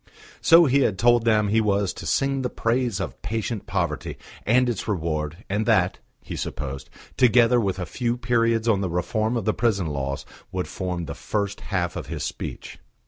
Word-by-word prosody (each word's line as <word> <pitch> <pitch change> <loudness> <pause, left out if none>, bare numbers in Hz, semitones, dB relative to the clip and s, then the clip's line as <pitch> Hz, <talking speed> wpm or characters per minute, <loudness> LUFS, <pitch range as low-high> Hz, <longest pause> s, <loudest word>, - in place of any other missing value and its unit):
So 165 0 +7
he 140 0 +3
had 105 -7 +1
told 120 +1 +4
them 105 -2 +3
he 110 +2 +3
was 100 -3 +1
to - - -7
sing 135 0 +1
the 125 - -1
praise 120 -3 0
of - - -5
patient 110 -1 -3
poverty 85 -5 -2 0.3
and 125 +3 +4
its 120 -5 -2
reward, 80 -2 -2
and 105 +3 -1
that, 95 -5 +3 0.2
he - - -6
supposed, 70 -1 -5 0.3
together 120 0 +5
with 95 -3 -1
a 90 - -3
few 120 +5 -2
periods 115 -2 +1
on 105 -4 +3
the 95 - -1
reform 110 +7 0
of 110 - -3
the 110 - +2
prison 105 -6 +1
laws, 70 -3 -3 0.3
would 90 -1 -2
form 90 -2 -3
the - - -5
first 100 -1 -3
half 90 -4 -2
of - - -5
his - - -4
speech. - - -6
105 Hz, 190 wpm, -24 LUFS, 90-120 Hz, 0.3 s, So